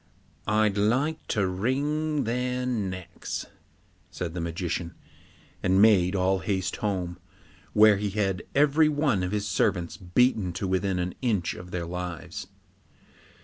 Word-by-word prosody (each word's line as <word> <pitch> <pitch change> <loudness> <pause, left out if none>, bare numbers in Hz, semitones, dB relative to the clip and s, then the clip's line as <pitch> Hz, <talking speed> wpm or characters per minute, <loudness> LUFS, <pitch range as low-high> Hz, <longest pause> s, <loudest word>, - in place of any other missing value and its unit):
'I'd 105 -1 +2
like 135 +10 +1
to 100 -2 +1
wring 145 +10 0
their 125 +2 -1
necks,' 95 -8 -4 0.6
said 85 -2 -5
the 85 - -3
magician, 85 0 -3 0.7
and 95 +1 +3
made 100 -3 +5
all 95 0 +2
haste 95 +1 -2
home, 90 -4 -2 0.5
where 105 -1 +7
he 105 +1 -1
had 95 -2 -1
every 150 +2 +5
one 145 -9 +1
of 90 0 -2
his 105 -1 -1
servants 90 -3 0
beaten 95 0 +1
to 95 +2 -3
within 95 0 0
an 90 0 -2
inch 105 -9 0
of 90 0 -10
their 90 -1 -3
lives. 90 -1 -5
100 Hz, 135 wpm, -27 LUFS, 90-120 Hz, 0.7 s, where